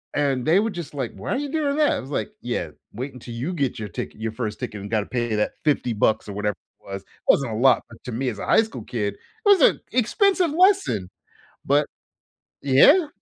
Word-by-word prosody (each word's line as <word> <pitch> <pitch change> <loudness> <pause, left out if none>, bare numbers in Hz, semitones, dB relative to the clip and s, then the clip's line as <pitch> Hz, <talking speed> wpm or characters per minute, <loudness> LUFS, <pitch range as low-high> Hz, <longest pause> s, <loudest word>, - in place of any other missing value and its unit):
and 140 -3 +1
they 170 +5 +5
were 220 +2 +1
just 175 -6 -7
like, 130 -5 -3
"Why - - -6
are - - +1
you 290 +1 -3
doing 290 -1 0
that?" 300 -1 +3
I - - -2
was 130 - -9
like, 110 -7 -2
yeah. - - -3 0.2
Wait 130 +6 -5
until 120 -1 -9
you 135 +10 -3
get 140 -7 -1
your 110 - -4
ticket 90 - -6
your 110 0 -2
1st 110 -2 -4
ticket 105 - -5
and 100 - -7
gotta 105 -2 +1
pay 120 -3 -2
that 105 - 0
50 140 -5 +1
bucks 110 +1 +1
or 100 - -6
whatever 105 0 -1 0.2
it - - -35
was. 95 0 -4
It - - -41 0.2
wasn't 135 -4 +3
a - - -3
lot, 125 +2 +4
but 115 - -15
to 125 - -5
me 125 +3 -1
as 105 -4 -6
a - - -4
high - - +5
school 130 - -8
kid, 105 -3 -2
it - - -26 0.3
was 400 -4 +6
an - - +5
expensive 360 - +2
lesson, 370 - +3 0.6
but, 145 +2 +3 0.8
yeah. 280 - +6
130 Hz, 235 wpm, -23 LUFS, -, 0.8 s, was